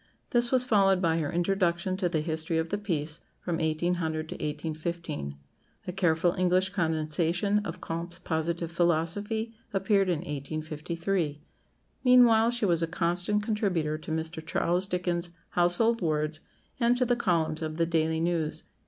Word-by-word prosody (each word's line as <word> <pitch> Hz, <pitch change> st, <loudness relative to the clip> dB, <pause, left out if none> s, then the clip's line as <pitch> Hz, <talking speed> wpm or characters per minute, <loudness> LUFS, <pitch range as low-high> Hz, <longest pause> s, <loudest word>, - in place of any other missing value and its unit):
This 240 Hz, 0 st, +2 dB
was 255 Hz, -1 st, +3 dB
followed 195 Hz, -5 st, +4 dB
by 165 Hz, -2 st, +2 dB
her 150 Hz, -3 st, -2 dB
"Introduction 180 Hz, +1 st, +1 dB
to 185 Hz, -2 st, 0 dB
the 160 Hz, -3 st, 0 dB
History 160 Hz, +1 st, -2 dB
of 160 Hz, 0 st, -1 dB
the 205 Hz, -, -1 dB
Peace, 165 Hz, -5 st, -3 dB, 0.2 s
from 175 Hz, -2 st, -2 dB
1800 160 Hz, 0 st, -1 dB
to -, -, -4 dB
1815." 155 Hz, -, -4 dB, 0.5 s
A -, -, -3 dB
careful 175 Hz, -2 st, +2 dB
English 185 Hz, +1 st, +3 dB
condensation 170 Hz, +2 st, +1 dB
of 190 Hz, -6 st, -6 dB
Comte's 170 Hz, +1 st, -5 dB
"Positive 165 Hz, +1 st, -2 dB
Philosophy" 175 Hz, +7 st, 0 dB, 0.2 s
appeared 195 Hz, -1 st, +2 dB
in 170 Hz, -3 st, 0 dB
1853. 155 Hz, +2 st, -3 dB, 0.6 s
Meanwhile 240 Hz, -3 st, +6 dB
she 240 Hz, -2 st, 0 dB
was 170 Hz, -3 st, +3 dB
a 165 Hz, -, +1 dB
constant 175 Hz, +5 st, 0 dB
contributor 180 Hz, -8 st, 0 dB
to 155 Hz, -, -10 dB
Mr. 160 Hz, 0 st, -3 dB
Charles 175 Hz, +3 st, +1 dB
Dickens's 175 Hz, -2 st, -2 dB
"Household 180 Hz, +7 st, +2 dB
Words," 155 Hz, -1 st, 0 dB, 0.4 s
and 240 Hz, 0 st, +3 dB
to 250 Hz, -, +2 dB
the 245 Hz, 0 st, +2 dB
columns 165 Hz, -7 st, 0 dB
of 155 Hz, 0 st, -4 dB
the 165 Hz, -, +2 dB
"Daily 160 Hz, -1 st, +1 dB
News." 165 Hz, -2 st, -1 dB
170 Hz, 150 wpm, -28 LUFS, 160-195 Hz, 0.6 s, Meanwhile